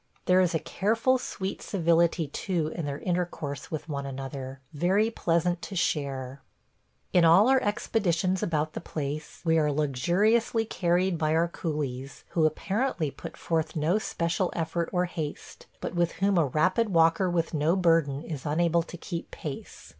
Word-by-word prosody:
There 185 0 +5
is 175 -2 +1
a - - +2
careful 225 +10 +1
sweet 195 -5 -4
civility 170 -2 +2
too 165 +1 -2
in 165 -1 -4
their 140 0 -3
intercourse 170 -5 -3
with 155 -1 -5
one 140 -3 -4
another, 135 0 -6
very 190 +9 +2
pleasant 170 -3 0
to 195 - -7
share.... 140 -5 -2 0.7
In 180 - +5
all 170 +7 +7
our 265 0 +4
expeditions 190 -3 0
about 155 -2 -1
the - - -5
place 150 -1 -5
we 160 0 +4
are 150 -1 +2
luxuriously 180 - +2
carried 175 -2 +1
by 155 0 +1
our 165 +1 +3
coolies, 140 -6 -4
who 160 -2 +3
apparently 190 - -1
put - - -9
forth 160 -2 -1
no 165 +7 +2
special 175 -2 -1
effort 170 0 -1
or 180 -1 +1
haste, 155 -4 -6
but - - -4
with 175 -1 +1
whom 195 +2 +1
a 155 - +3
rapid 185 - +2
walker 165 +1 +3
with 170 -1 -1
no 155 +3 +2
burden 165 -6 +2
is 150 -5 -6
unable 170 +3 +2
to 175 +1 -9
keep 170 0 -6
pace. 145 -3 -8
165 Hz, 160 wpm, -27 LUFS, 150-180 Hz, 0.7 s, all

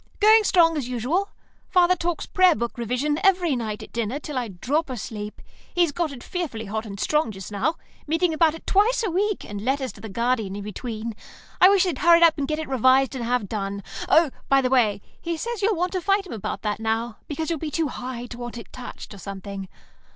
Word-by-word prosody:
"Going 435 +1 +7
strong, 330 -5 +4
as 270 -5 -2
usual. 265 - 0 0.4
Father 360 0 +5
talks 345 -1 -2
Prayer 370 -3 +4
Book 235 +1 -3
revision 250 +6 -1
every 360 -6 +3
night 220 -3 -4
at - - -13
dinner 235 +3 -1
till 300 -1 -7
I 250 -2 -1
drop 270 - -1
asleep. 210 -3 -6 0.3
He's 345 -3 +3
got 330 +1 -1
it 250 -4 -9
fearfully 295 -12 -4
hot 220 +2 -4
and 200 -1 -7
strong 300 0 +1
just 190 -1 -8
now; 230 +11 0 0.3
meetings 325 +2 +2
about 320 0 +3
it 325 - -12
twice 435 +5 +3
a 395 - -1
week, 410 +3 0
and 205 -2 -6
letters 265 +2 -1
to - - -15
the 220 - -7
Guardian 230 -2 0
in 205 - -5
between. 220 +2 -5 0.5
I 370 - +9
wish 395 -2 +5
they'd 350 -8 -1
hurry 340 0 +6
up 330 -2 +5
and 275 - -1
get 305 - -1
it 315 - -4
revised 260 +1 +4
and 255 -3 -4
have 240 -3 0
done. 200 -1 -4 0.3
Oh, 320 -3 +5 0.2
by 275 - +6
the 255 -1 0
way, 220 -6 +3 0.2
he 335 -1 -2
says 470 +5 -4
you'll 415 +1 +2
want 360 +2 0
to 370 - -2
fight 395 +2 +2
him 365 - -8
about 215 - -4
that 210 -1 -1
now 225 0 -1
because 315 +2 -3
you'll 325 - -1
be 315 - -3
too 315 0 0
High 245 -1 -5
to 240 0 -9
want 240 0 -6
it 230 - -10
touched, 250 -3 -9
or 200 - -11
something. 195 0 -7
265 Hz, 225 wpm, -24 LUFS, 225-335 Hz, 0.5 s, I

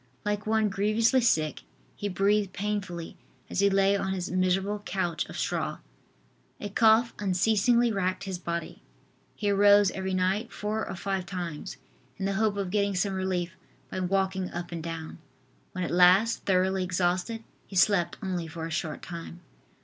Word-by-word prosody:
Like 210 0 -1
one 220 0 +3
grievously 215 +6 +2
sick 155 -10 +1 0.3
he 205 - -3
breathed 200 +1 +1
painfully 195 -5 -4 0.3
as - - -1
he 200 0 +5
lay 195 0 +3
on 195 -1 -1
his 185 -2 -3
miserable 185 +3 +1
couch 175 -4 -1
of - - -8
straw. - - -1 0.8
A 205 - -5
cough 225 +2 +4
unceasingly 220 +5 +3
racked 185 -3 -1
his 190 -3 -4
body. 170 -1 -4 0.5
He 205 -1 0
arose 205 0 +6
every 190 0 -3
night 190 +5 0
four 215 +1 -3
or - - -4
five 190 0 -3
times, 175 -8 -5 0.4
in 190 - -3
the 195 - 0
hope 210 0 +1
of 195 -2 -2
getting 200 -1 +1
some 195 +2 0
relief 185 -2 -1 0.4
by - - -3
walking 190 0 0
up 175 0 -6
and 170 -1 -4
down. 165 -1 -6 0.5
When 185 - -3
at - - -3
last 185 +6 +5
thoroughly 190 0 +2
exhausted 185 +5 -1 0.2
he 195 - -10
slept 185 -2 +3
only 180 -3 -2
for 160 0 -6
a 165 - -6
short 155 -1 -3
time. 170 0 -8
190 Hz, 165 wpm, -28 LUFS, 180-205 Hz, 0.8 s, arose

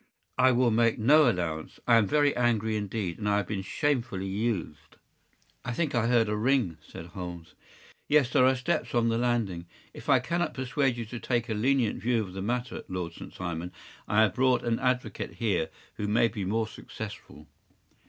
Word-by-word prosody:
” - - -48
“I 130 - +6
will 120 -1 +3
make 115 0 +3
no 145 +5 +5
allowance. 80 -6 -3
I 115 -1 +6
am 110 -3 +3
very 145 +4 +3
angry 110 -3 +1
indeed, 100 -4 -3
and 105 -1 -1
I 100 - +3
have 105 - 0
been 100 -2 -3
shamefully 120 -3 -1
used.” 95 -7 -3 0.7
“I 125 - -3
think 155 +3 -1
that 115 -2 +1
I - - +1
heard 120 -2 +3
a 105 - -1
ring,” 110 - +1
said 80 - -10
Holmes. 90 -2 -8 0.5
“Yes, 145 -4 +3
there 125 - +4
are 130 - +4
steps 130 +1 -2
on 115 -1 +3
the 115 0 +1
landing. 110 -8 -1 0.3
If - - -9
I - - +7
cannot 170 -2 -1
persuade 130 -1 0
you 115 - -4
to 115 +2 -7
take 120 0 -1
a - - 0
lenient 120 +1 +1
view 120 -1 +1
of 95 -3 -9
the 95 - -5
matter, 120 +4 -3
Lord 90 -3 -4
St. - - -10
Simon, 85 -1 -5 0.4
I 105 +1 +3
have 105 - +2
brought 130 0 +2
an 115 -1 0
advocate 125 -1 -1
here 100 -9 0 0.3
who 105 - -2
may 115 +2 +3
be 105 -4 -4
more 110 +3 0
successful. 105 -9 -9
115 Hz, 200 wpm, -28 LUFS, 95-125 Hz, 0.7 s, I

